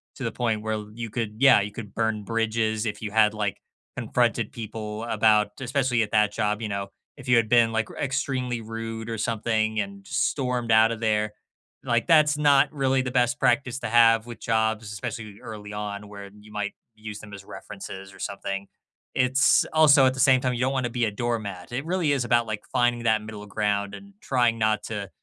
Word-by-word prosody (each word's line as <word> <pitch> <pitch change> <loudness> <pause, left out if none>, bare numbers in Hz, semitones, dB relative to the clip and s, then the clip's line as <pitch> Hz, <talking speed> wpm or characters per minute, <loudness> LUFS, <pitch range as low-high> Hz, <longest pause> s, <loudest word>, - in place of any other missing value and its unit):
to - - -7
the - - -1
point 115 -3 -1
where 110 -1 -3
you 115 0 -6
could, 110 -1 -3
yeah, 135 -4 +7
you 105 +1 -4
could 105 0 -9
burn 110 -2 -1
bridges 110 0 0
if 105 -1 -4
you 105 -2 -4
had 110 -1 +4
like 105 -2 -2 0.4
confronted - - 0
people 110 -1 -6
about 110 -2 +3
especially 130 -2 +1
at 105 - -6
that 105 -1 +3
job, 105 0 -1
you 110 - -3
know 100 -1 -3 0.3
if 140 -2 -12
you 125 - +5
had 115 -2 +3
been, 115 -1 +5
like, 110 -1 -1
e - - -12
extremely 130 -3 -2
rude 115 0 -6
or 115 - -3
something 110 0 0
and 100 -1 -8
stormed 125 -4 -1
out 110 +1 +6
of 115 - -7
there, 105 -1 +1 0.5
like, 120 -1 0
that's 155 -3 +5
not 145 -2 +4
really 135 -2 +1
the 125 -1 -4
best 125 +3 +2
practice 125 0 +1
to 115 - -4
have 115 -1 +5
with 120 -1 -9
jobs, 110 -1 0
especially 105 +1 -6
early 105 -2 -8
on 105 0 -5
where 100 -1 -10
you 105 +1 -16
might 105 -1 -2 0.2
use 110 -1 -8
them 105 -1 -12
as 100 -1 -9
references 95 0 -9
or - - -15
something. 100 0 -4 0.5
It's 130 +1 +4
also, 150 -3 +6
at 130 - +3
the 130 - -7
same 130 -1 +6
time, 130 -1 0
you 120 - -3
don't 130 +1 +2
want 130 -2 -1
be 120 - 0
a 110 - -1
doormat. 105 -5 -4
It 130 +4 -3
really 170 -3 0
is 135 -3 0
about 120 -1 +2
like 105 -1 -4
finding 120 -1 +1
that 110 -2 +2
middle 105 -1 -9
ground 100 -1 -1
and 200 0 -11
trying 120 -6 +1
not 110 -1 +1
to 100 -3 -5
110 Hz, 205 wpm, -25 LUFS, 105-125 Hz, 0.5 s, yeah